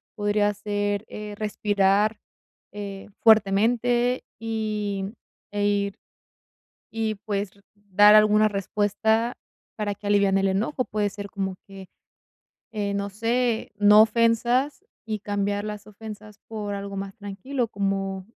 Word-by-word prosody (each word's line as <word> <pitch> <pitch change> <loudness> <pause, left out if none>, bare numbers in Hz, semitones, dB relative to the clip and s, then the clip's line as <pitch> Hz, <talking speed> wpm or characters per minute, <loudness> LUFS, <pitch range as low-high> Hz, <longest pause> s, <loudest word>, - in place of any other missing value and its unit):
Podría 205 -1 +1
ser, 205 0 -2
eh, 210 0 -7
respirar, 205 0 +1 0.6
eh, 200 -1 -7
fuertemente, 235 +4 +3 0.2
y 210 -3 -3 0.4
e 205 0 0
ir 200 -1 0 1.0
y, 220 -1 -1
pues, 200 -2 -2
r 200 - -23
dar 205 +1 +5
alguna 215 0 +6
respuesta 210 +3 0 0.4
para 210 -2 -2
que 205 +1 -8
aliviane 200 -1 +3
el 195 - +2
enojo. 225 +7 0
Puede 205 0 -1
ser 200 0 -7
como 190 -1 -3
que, 195 -1 -11 0.9
eh, 205 -2 -2
no 200 0 -2
sé, 230 +2 0
no 210 +1 +7
ofensas, 235 - +2 0.2
y 215 -1 -3
cambiar 205 0 -1
las 210 -1 -6
ofensas 210 0 -10
por 210 -2 -4
algo 200 0 -6
más 195 0 -5
tranquilo, 230 +5 -3
como: 195 -1 -2
205 Hz, 125 wpm, -25 LUFS, 200-220 Hz, 1.0 s, no